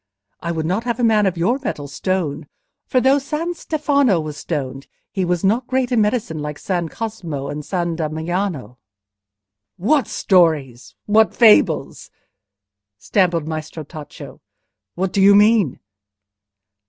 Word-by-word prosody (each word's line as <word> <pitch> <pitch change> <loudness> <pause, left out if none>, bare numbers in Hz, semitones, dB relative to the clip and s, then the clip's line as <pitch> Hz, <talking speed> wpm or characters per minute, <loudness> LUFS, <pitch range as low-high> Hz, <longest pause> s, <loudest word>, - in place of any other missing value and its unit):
I 170 - -3
would 160 -2 -2
not 190 +7 -1
have 235 -1 -2
a - - 0
man 215 -3 +4
of 185 -2 -2
your 230 +11 +1
metal 145 - -4
stoned, 170 +1 -3 0.4
for 255 - +2
though 265 +3 +4
San 305 +5 -3
Stefano 285 - +1
was 155 -2 -5
stoned, 140 -3 -5 0.2
he 190 - -1
was 175 -1 -1
not 230 +6 +1
great 260 -1 0
in 235 -3 +3
medicine 210 -7 -1
like 150 0 -5
San 175 -4 -2
Cosmo 175 -12 -5
and 150 +1 -5
San 170 0 -2
Damiano..." 160 -3 -3 1.0
"What 255 - +2
stories? 155 - +1
what 215 +1 +3
fables?" 225 -3 +3 0.9
stammered 175 - 0
Maestro 155 0 -5
Tacco. 150 0 -11 0.6
"What 185 +1 -2
do 200 - +2
you 200 +1 +7
mean?" 210 - +4
185 Hz, 140 wpm, -20 LUFS, 155-225 Hz, 1.0 s, you